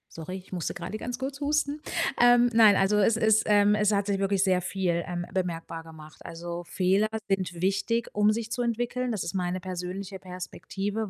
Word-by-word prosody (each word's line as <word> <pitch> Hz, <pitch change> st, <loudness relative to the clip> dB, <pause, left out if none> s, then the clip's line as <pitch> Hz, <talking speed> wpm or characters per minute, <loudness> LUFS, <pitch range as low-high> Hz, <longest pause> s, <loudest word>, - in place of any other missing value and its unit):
Sorry, 175 Hz, +4 st, -6 dB
ich 185 Hz, 0 st, -13 dB
musste 175 Hz, -3 st, -2 dB
gerade 215 Hz, -, -5 dB
ganz 240 Hz, +2 st, -5 dB
kurz 275 Hz, +2 st, -5 dB
husten. 295 Hz, 0 st, 0 dB, 0.4 s
Ähm, 245 Hz, 0 st, +6 dB
nein, 220 Hz, -3 st, +7 dB
also, 195 Hz, +2 st, +3 dB
es 215 Hz, +2 st, +3 dB
ist, 220 Hz, -1 st, +4 dB
ähm 205 Hz, 0 st, +4 dB
es 210 Hz, 0 st, +2 dB
hat 200 Hz, -1 st, +1 dB
sich 200 Hz, -1 st, -1 dB
wirklich 195 Hz, -1 st, +1 dB
sehr 185 Hz, -2 st, +2 dB
viel, 180 Hz, -2 st, -1 dB
ähm, 175 Hz, -1 st, -4 dB
bemerkbar 165 Hz, -3 st, -3 dB
gemacht. 155 Hz, -1 st, -13 dB
Also, 170 Hz, +1 st, -6 dB
Fehler 190 Hz, +4 st, +1 dB, 0.2 s
sind 185 Hz, -3 st, -2 dB
wichtig, 200 Hz, +5 st, 0 dB
um 210 Hz, +1 st, +4 dB
sich 225 Hz, +1 st, -3 dB
zu 250 Hz, -, -1 dB
entwickeln. 240 Hz, +1 st, -1 dB
Das 210 Hz, -5 st, -2 dB
ist 170 Hz, -, -4 dB
meine 180 Hz, 0 st, -1 dB
persönliche 185 Hz, +1 st, -5 dB
Perspektive, 195 Hz, +3 st, -5 dB
195 Hz, 190 wpm, -27 LUFS, 180-220 Hz, 0.4 s, nein